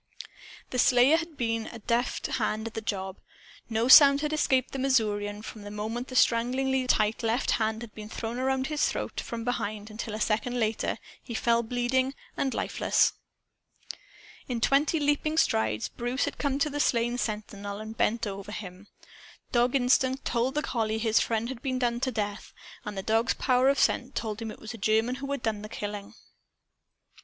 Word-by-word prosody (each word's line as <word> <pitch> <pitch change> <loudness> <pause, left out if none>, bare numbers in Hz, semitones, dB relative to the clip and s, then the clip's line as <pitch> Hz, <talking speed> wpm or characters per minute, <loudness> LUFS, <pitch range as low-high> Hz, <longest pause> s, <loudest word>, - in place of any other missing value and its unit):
The 250 - -1
slayer 255 +6 +5
had 330 -2 -6
been 230 -2 -1
a 235 - -8
deft 235 +2 -1
hand 215 +1 -1
at 230 - -5
the 225 - -4
job. 190 -3 -4 0.5
No 225 +1 +1
sound 280 +1 +9
had 300 0 -1
escaped 265 -4 +2
the 270 - -4
Missourian, 210 -5 0
from 215 - -8
the 205 - -8
moment 220 +4 -4
the 255 - -8
stranglingly 255 +2 +2
tight 215 -2 +2
left 230 +1 +1
arm 220 0 0
had 235 -3 -9
been 215 -1 -9
thrown 230 +2 -4
around 265 0 0
his 300 +1 +1
throat - - -4
from 230 -1 -5
behind 215 -3 -3
until, 215 0 -5
a - - -5
second 225 +3 0
later, 220 -1 0 0.2
he 235 - -7
fell 235 +1 +2
bleeding 250 +3 0 0.2
and 270 - -1
lifeless. - - +2 1.3
In 245 -2 -2
twenty 285 +7 +2
leaping 295 +2 +1
strides, 110 - +1
Bruce 245 +3 -2
came 280 -2 0
up 280 - -3
to 300 - +2
the 290 - -3
slain 240 -2 +1
sentinel 205 -2 -4
and 220 +1 -7
bent 230 +1 +1
over 200 0 -6
him. 195 -1 -8 0.6
Dog 245 +1 +2
instinct 260 +1 +2
told 250 +3 0
the 300 - 0
collie 220 -5 -1
his 220 0 +2
friend 225 0 0
had 255 -2 -6
been 260 -2 -1
done 240 -1 0
to 260 - 0
death. 205 -3 -4 0.3
And 210 -1 -5
the 195 - -3
dog's 225 +4 +2
power 255 +1 +3
of 280 - +2
scent 255 0 +1
told 220 -1 -3
him 225 - -4
it - - -9
was 225 +2 -7
a 230 - -9
German 220 +4 +2
who 275 +1 -5
had 280 -3 -3
done 215 -2 -1
the 215 - -8
killing. 205 -2 -6
235 Hz, 185 wpm, -28 LUFS, 215-260 Hz, 1.3 s, sound